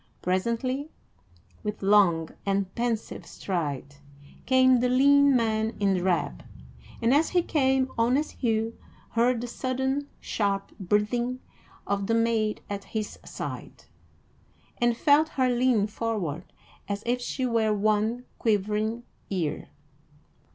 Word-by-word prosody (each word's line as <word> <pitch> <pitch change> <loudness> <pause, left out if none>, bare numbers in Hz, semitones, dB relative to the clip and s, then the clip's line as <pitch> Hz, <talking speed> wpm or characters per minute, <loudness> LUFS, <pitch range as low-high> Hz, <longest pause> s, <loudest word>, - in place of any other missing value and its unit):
Presently, 235 - -1 0.7
with 210 -1 -5
long 190 -5 +4
and 195 -1 -1
pensive 235 -2 -2
stride, 145 -6 -4 0.5
came 260 0 +5
the 250 +1 +1
lean 280 +2 +5
man 220 -1 +1
in 200 -2 +2
drab; 175 - -1 0.6
and 235 +3 +4
as 300 +3 +3
he 355 -2 +2
came, 265 -4 +2
honest 255 +6 +2
Hugh 225 -2 -1 0.4
heard 235 +1 +2
the - - -3
sudden, 265 +3 -2
sharp 200 -2 -1
breathing 215 +6 0 0.5
of 200 -1 -1
the 230 - +2
maid 230 -2 +1
at 200 -1 -5
his 215 -2 -5
side, - - -7 1.0
and 240 -1 +2
felt 300 +4 +4
her 260 -4 +1
lean 245 -4 +3
forward 205 -7 -3 0.4
as 200 +1 -3
if 245 +1 0
she 255 +1 -2
were 230 -3 +2
one 215 +3 +1
quivering 215 +2 0 0.3
ear. 175 -6 -2
225 Hz, 120 wpm, -27 LUFS, 200-255 Hz, 1.0 s, came